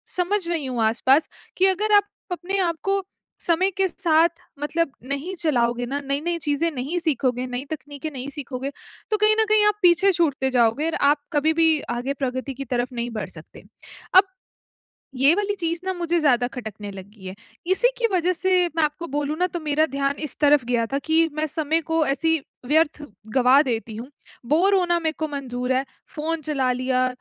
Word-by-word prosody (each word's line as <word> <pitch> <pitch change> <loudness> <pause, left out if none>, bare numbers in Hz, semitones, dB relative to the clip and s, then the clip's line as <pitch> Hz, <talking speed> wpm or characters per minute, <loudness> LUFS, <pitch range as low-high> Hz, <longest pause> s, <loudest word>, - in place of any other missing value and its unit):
समझ 365 +1 0
रही 325 -5 -1
हूँ 245 -3 -2
आसपास 260 +7 +3 0.3
कि 380 - +5
अगर 415 +3 +2
आप 410 0 +4 0.2
अपने 360 +3 -2
आपको 390 +4 -1 0.5
समय 350 +3 +3
के 385 -1 +3
साथ 335 -3 +2 0.3
मतलब 305 +1 -1 0.2
नहीं 305 +7 -3
चलाओगे 245 -8 0
ना, 275 +4 -3
नई-नई 300 +5 -1
चीज़ें 295 +3 +1
नहीं 285 +5 -3
सीखोगे, 255 -6 0
नई 250 +1 -4
तकनीकें 295 0 -6
नहीं 265 -1 -5
सीखोगे, 275 -1 -5 0.4
तो 430 - +3
कहीं 425 +1 +5
न - - +3
कहीं 430 -1 +5
आप 420 0 +1
पीछे 355 +2 +5
छूटते 290 -7 +1
जाओगे 245 +3 +2
और 330 - -1 0.2
आप 290 0 -1
कभी 310 +2 +2
भी 320 -1 +3 0.2
आगे 265 +3 -2
प्रगति 260 -1 -4
की 275 +1 -7
तरफ 245 +1 -2
नहीं 240 0 -3
बढ़ 220 -2 -5
सकते। - - -12 0.5
अब 385 +1 +8 0.9
ये 275 +6 +6
वाली 410 0 -1
चीज़ 335 -1 -2
ना 375 - -1
मुझे 345 -1 0
ज़्यादा 250 -5 +3
खटकने 215 -4 -7
लगी 195 +1 -12
है। 185 - -6 0.4
इसी 485 +6 +3
की 470 - +2
वजह 360 0 +2
से 365 0 +2
मैं 325 - +2
आपको 305 +3 -3
बोलूँ 290 +2 -2
ना 360 - +3
तो 350 -1 -5
मेरा 310 0 +1
ध्यान 275 0 -2
इस 285 - -5
तरफ 290 -3 +4
गया 235 -1 0
था 275 - +1
कि 320 +3 +2
मैं 310 0 -1
समय 315 +1 -1
को 325 -1 +2
ऐसी 325 +4 +1 0.3
व्यर्थ 300 +1 +2 0.3
गवा 260 +1 +5
देती 230 -4 -3
हूँ। 235 +3 -7 0.4
बोर 365 +6 +4
होना 350 -2 +2
मेरे 320 -1 -1
को 315 - -2
मंजूर 255 -3 -3
है, 260 +1 +1 0.3
फ़ोन 320 +1 -2
चला 275 -4 0
लिया, 255 0 0
300 Hz, 190 wpm, -23 LUFS, 260-340 Hz, 0.9 s, अब